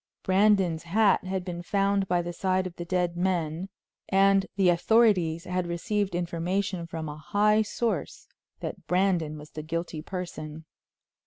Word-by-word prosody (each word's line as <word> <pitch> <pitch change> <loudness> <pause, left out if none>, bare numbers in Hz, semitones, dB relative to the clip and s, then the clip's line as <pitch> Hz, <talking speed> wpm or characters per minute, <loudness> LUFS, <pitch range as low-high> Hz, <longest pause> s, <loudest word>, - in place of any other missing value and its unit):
Brandon's 190 -4 +3
hat 200 +3 +2
had 185 -1 -3
been 175 -2 -5
found 195 +1 +1
by 175 -1 +1
the 175 0 -5
side 185 +1 0
of 180 -2 -6
the 175 - -6
dead 180 -1 0
men, 175 -1 -1 0.4
and 195 0 +4
the 195 -2 +3
authorities 175 -3 +3
had 180 -1 -2
received 195 +2 -1
information 175 +1 -2
from 160 -1 -5
a 150 0 -6
high 210 +7 +2
source 210 - -3 0.3
that - - -6
Brandon 180 -4 +1
was 150 0 -12
the 155 - -6
guilty 165 0 -4
person. 160 -3 -6
180 Hz, 150 wpm, -27 LUFS, 170-195 Hz, 0.4 s, and